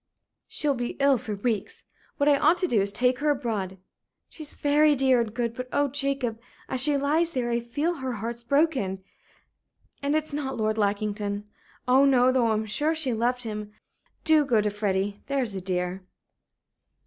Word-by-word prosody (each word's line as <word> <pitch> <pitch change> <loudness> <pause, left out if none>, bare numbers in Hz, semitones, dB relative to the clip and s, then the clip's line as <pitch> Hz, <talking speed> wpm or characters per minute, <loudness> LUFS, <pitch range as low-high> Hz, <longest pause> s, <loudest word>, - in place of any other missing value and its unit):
"She'll 295 -2 -1
be 245 -2 -4
ill 275 -2 +4
for 215 -4 -5
weeks. 210 0 -3 0.3
What 285 - +1
I 290 - +6
ought 315 +5 +3
to 365 - 0
do 225 - +2
is 200 +1 +6
to - - -3
take 250 0 +2
her 300 +1 +1
abroad. 220 -9 -2 0.5
She's 310 -2 -8
very 295 +1 +3
dear 260 -2 +3
and 225 -2 -3
good; 235 0 -2
but, 250 +1 -7
oh, 285 0 +1
Jacob, 275 -4 -1 0.3
as 260 - +1
she 290 +1 +6
lies 315 +4 +1
there 240 -2 -1
I 235 - +1
feel 290 +9 -2
her 260 -2 -4
heart's 235 +2 -5
broken. 255 - 0 1.0
And 285 +1 0
it's 310 -1 -2
not 275 -2 -3
Lord 215 0 -1
Lackington. 205 0 -2 0.4
Oh 260 +2 +5
no! 255 -2 +4
though 255 -2 +2
I'm 220 -1 0
sure 295 +9 0
she 285 -6 +1
loved 245 +2 -1
him. 210 -2 -6 0.5
Do 315 -2 +5
go 245 -6 +2
to 210 0 0
Freddie, 200 -1 -2
there's 265 -6 -1
a 190 - -5
dear." 180 0 -3
245 Hz, 185 wpm, -26 LUFS, 215-280 Hz, 1.0 s, I